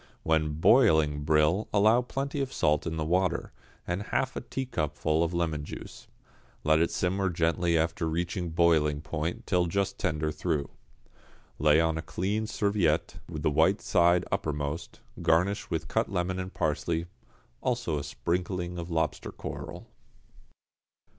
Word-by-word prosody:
When 80 Hz, -1 st, +1 dB
boiling 80 Hz, -, +4 dB
brill 80 Hz, +6 st, +3 dB
allow 110 Hz, +4 st, +5 dB
plenty 140 Hz, +3 st, -3 dB
of 135 Hz, -1 st, -2 dB
salt 75 Hz, -, +1 dB
in 80 Hz, 0 st, -3 dB
the 80 Hz, -, -1 dB
water, 90 Hz, +3 st, 0 dB, 0.3 s
and 90 Hz, +3 st, -2 dB
half 130 Hz, +5 st, -1 dB
a -, -, -3 dB
teacupful 80 Hz, -, -1 dB
of 85 Hz, -, -1 dB
lemon 80 Hz, -4 st, -1 dB
juice. -, -, -9 dB, 0.6 s
Let 80 Hz, +1 st, +4 dB
it 85 Hz, -, +2 dB
simmer 95 Hz, +2 st, 0 dB
gently 85 Hz, 0 st, +1 dB
after 80 Hz, 0 st, 0 dB
reaching 85 Hz, +2 st, -2 dB
boiling 80 Hz, -3 st, +3 dB
point 75 Hz, +3 st, -4 dB
till 90 Hz, -2 st, +2 dB
just 100 Hz, +3 st, -1 dB
tender 75 Hz, 0 st, 0 dB
through. 75 Hz, -3 st, -2 dB, 0.9 s
Lay 75 Hz, +1 st, +5 dB
on 80 Hz, -1 st, +1 dB
a -, -, -2 dB
clean 105 Hz, +7 st, -2 dB
serviette, 100 Hz, -7 st, 0 dB
the 75 Hz, -2 st, -1 dB
white 80 Hz, +7 st, +3 dB
side 85 Hz, -1 st, +3 dB
uppermost, 75 Hz, +1 st, -3 dB, 0.2 s
garnish 90 Hz, +6 st, +2 dB
with 80 Hz, -3 st, -2 dB
cut -, -, 0 dB
lemon 95 Hz, 0 st, -1 dB
and 95 Hz, 0 st, -4 dB
parsley, 80 Hz, +2 st, -1 dB, 0.6 s
also 120 Hz, -, -1 dB
a -, -, -5 dB
sprinkling 90 Hz, +3 st, -2 dB
of 85 Hz, 0 st, -6 dB
lobster 80 Hz, -1 st, -1 dB
coral. -, -, -7 dB
85 Hz, 140 wpm, -28 LUFS, 80-95 Hz, 0.9 s, allow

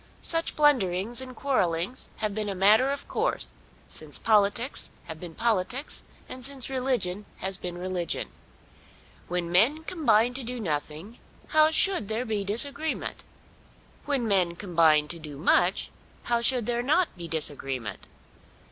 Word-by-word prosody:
Such 330 Hz, 0 st, -1 dB
blunderings 235 Hz, -6 st, +3 dB
and 255 Hz, -1 st, -8 dB
quarrellings 195 Hz, -5 st, -1 dB
have 215 Hz, -2 st, -2 dB
been 210 Hz, 0 st, -2 dB
a 195 Hz, -, -3 dB
matter 210 Hz, +8 st, +5 dB
of 280 Hz, -, -5 dB
course -, -, -1 dB, 0.4 s
since -, -, -4 dB
politics 220 Hz, +4 st, +1 dB
have 160 Hz, -1 st, -8 dB
been 170 Hz, -2 st, -9 dB
politics, 235 Hz, +5 st, -1 dB, 0.3 s
and 255 Hz, -, -9 dB
since 270 Hz, 0 st, -1 dB
religion 240 Hz, -7 st, -1 dB
has 190 Hz, 0 st, -2 dB
been 175 Hz, -1 st, -5 dB
religion. 180 Hz, -2 st, -3 dB, 1.0 s
When 175 Hz, -1 st, -2 dB
men 245 Hz, -, +4 dB
combine 245 Hz, -, +2 dB
to 265 Hz, +1 st, -3 dB
do 245 Hz, +1 st, -5 dB
nothing, 160 Hz, +3 st, -4 dB, 0.3 s
how 310 Hz, 0 st, +5 dB
should 350 Hz, -, +2 dB
there 220 Hz, +4 st, -2 dB
be 215 Hz, -3 st, -1 dB
disagreement? 280 Hz, +10 st, -1 dB, 0.8 s
When 275 Hz, -5 st, 0 dB
men 185 Hz, -4 st, +2 dB
combine 165 Hz, -5 st, +3 dB
to 170 Hz, -, -3 dB
do 150 Hz, -3 st, -9 dB
much, 175 Hz, +4 st, +2 dB, 0.3 s
how 235 Hz, -1 st, 0 dB
should 245 Hz, -1 st, +3 dB
there 240 Hz, +1 st, 0 dB
not 310 Hz, +8 st, +1 dB
be 170 Hz, -2 st, -7 dB
disagreement? 135 Hz, -7 st, -2 dB
215 Hz, 140 wpm, -27 LUFS, 175-255 Hz, 1.0 s, matter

